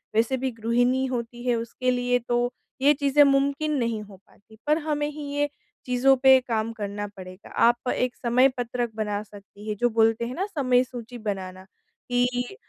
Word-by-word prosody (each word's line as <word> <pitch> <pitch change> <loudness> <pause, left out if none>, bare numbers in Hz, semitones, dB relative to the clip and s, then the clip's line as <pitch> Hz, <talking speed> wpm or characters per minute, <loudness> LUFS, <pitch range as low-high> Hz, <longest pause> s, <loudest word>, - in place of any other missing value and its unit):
वैसे 230 +4 +2
भी 260 +1 -2
गृहिणी 245 +3 +1
होती 240 -1 -4
है 245 - +3
उसके 235 +2 -2
लिए 245 0 +1
तो 240 0 +1 0.3
ये 285 +2 +6
चीज़ें 285 0 +4
मुमकिन 280 +2 +2
नहीं 230 -3 -1
हो 200 -1 -13
पाती। 220 +2 -21
पर 300 +1 +4
हमें 295 -1 0
ही 300 0 -8
ये 290 0 +1 0.4
चीज़ों 255 +2 +4
पे 265 0 +8
काम 225 -1 -1
करना 205 -1 -4
पड़ेगा। 185 +1 -11 0.2
आप 240 +1 +1
एक 250 0 -1
समय 250 +2 +3
पत्रक 240 -1 -2
बना 210 -1 -2
सकती 205 0 -14
हैं। 210 - -2
जो 240 - +4
बोलते 225 0 +2
हैं 245 +2 -5
न 385 - +1
समय 255 -9 +2
सूची 245 -1 -9
बनाना 190 -4 -5 0.5
कि 245 +5 0
245 Hz, 180 wpm, -25 LUFS, 220-265 Hz, 0.5 s, पे